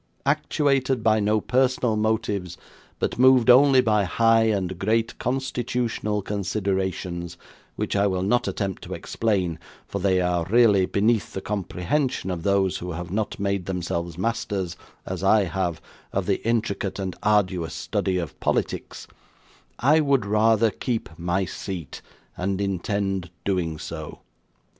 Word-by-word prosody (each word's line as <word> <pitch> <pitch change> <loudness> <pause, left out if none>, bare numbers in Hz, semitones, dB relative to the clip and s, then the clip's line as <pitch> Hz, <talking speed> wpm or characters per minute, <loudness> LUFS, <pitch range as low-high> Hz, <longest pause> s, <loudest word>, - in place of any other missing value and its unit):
Actuated 135 -5 +1
by 110 -1 +4
no 105 +1 +2
personal 125 -1 +1
motives, 105 -4 -1 0.4
but - - -2
moved 130 -2 +6
only 130 +1 +7
by 105 -4 +2
high 115 +4 +3
and 95 -5 -1
great 115 +3 +1
constitutional 120 -4 -2
considerations; 95 -3 -2 0.4
which - - -2
I 100 0 +3
will 95 -1 -1
not 120 +5 +1
attempt 100 -3 -3
to - - -5
explain, 95 -7 -1 0.3
for 100 - -4
they 95 -1 +2
are 90 -1 +1
really 105 -5 +5
beneath 110 +2 +1
the - - -3
comprehension 100 - -2
of 85 -2 -3
those 100 0 +1
who 90 0 -5
have 85 +1 -6
not 105 +2 -2
made 100 -2 -1
themselves 85 -2 -3
masters, 95 -4 -2 0.3
as - - -5
I 105 +2 +5
have, 90 -3 -2 0.3
of 95 -1 -1
the 100 0 0
intricate 110 -4 -1
and 95 -2 -4
arduous 95 -6 +1
study 95 -1 -1
of 85 -3 -5
politics; - - -2 0.7
I 150 +5 +4
would 140 -7 +2
rather 110 +1 +3
keep 115 +1 -3
my 90 +3 0
seat, 90 -5 -6 0.3
and 95 +1 -2
intend 95 -1 -1 0.2
doing 90 -5 -1
so. - - -7
100 Hz, 140 wpm, -24 LUFS, 90-115 Hz, 0.7 s, only